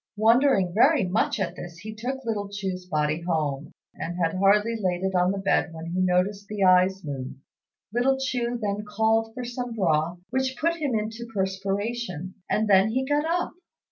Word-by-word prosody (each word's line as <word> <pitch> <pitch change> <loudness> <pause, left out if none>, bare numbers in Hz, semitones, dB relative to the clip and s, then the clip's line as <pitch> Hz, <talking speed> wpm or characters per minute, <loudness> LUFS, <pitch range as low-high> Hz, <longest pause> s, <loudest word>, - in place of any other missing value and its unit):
Wondering 225 -4 +4
very 270 - +5
much 190 +4 0
at 185 -3 -2
this, 175 -1 -9
he 215 +5 -8
took 255 +4 -5
little 205 -3 -2
Chu's 190 -3 -4
body 155 -1 0
home, 155 -4 -2 0.2
and 175 +1 -5
had 165 -2 +1
hardly 205 +4 +3
laid 185 -4 -1
it 190 0 0
on 180 0 +3
the 200 - -3
bed 195 -3 +1
when 160 0 -7
he 180 - -1
noticed 185 +3 +1
the 210 -1 -2
eyes 185 +1 +4
move. 135 -4 -5 0.6
Little 260 +3 +2
Chu 245 -2 -1
then 205 -1 -2
called 220 +1 +1
for 250 - -4
some 245 -1 -4
broth, 170 -3 +1
which 260 0 -1
put 335 +2 +1
him 285 -7 -1
into 220 +2 -3
a - - -16
perspiration, 195 -1 -2 0.2
and 215 +1 +1
then 195 +1 +5
he 260 +4 0
got 290 +2 +1
up. 345 +2 0
200 Hz, 185 wpm, -26 LUFS, 180-235 Hz, 0.6 s, very